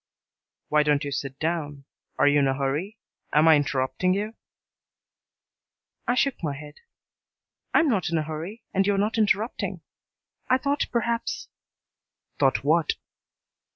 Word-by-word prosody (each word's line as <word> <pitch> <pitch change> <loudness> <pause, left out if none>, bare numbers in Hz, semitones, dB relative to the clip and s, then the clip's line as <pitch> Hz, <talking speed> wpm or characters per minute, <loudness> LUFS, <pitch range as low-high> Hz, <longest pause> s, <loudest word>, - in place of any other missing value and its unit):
"Why 150 0 +4
don't 150 0 +2
you 145 - -4
sit 135 -1 -4
down? 150 -4 -3 0.3
Are - - +4
you 145 0 +5
in 140 - +3
a 135 - +1
hurry? 150 +10 -2 0.4
Am 155 +2 +5
I 160 - +8
interrupting 140 +5 +1
you?" 210 +2 -2 1.7
I 245 - +2
shook 275 +1 +1
my 150 -4 -1
head. 150 +1 -11 0.9
"I - - +5
am 325 - +2
not 195 - +1
in 165 - 0
a 155 - 0
hurry, 160 +8 -6
and 195 0 +2
you 205 - +3
are - - -1
not 215 +3 +1
interrupting. 215 +2 0 0.7
I 255 - +5
thought 285 +2 0
perhaps 235 0 -1 0.4
" - - -49
"Thought 135 -2 +3
what?" 155 +2 +3
160 Hz, 155 wpm, -26 LUFS, 145-215 Hz, 1.7 s, I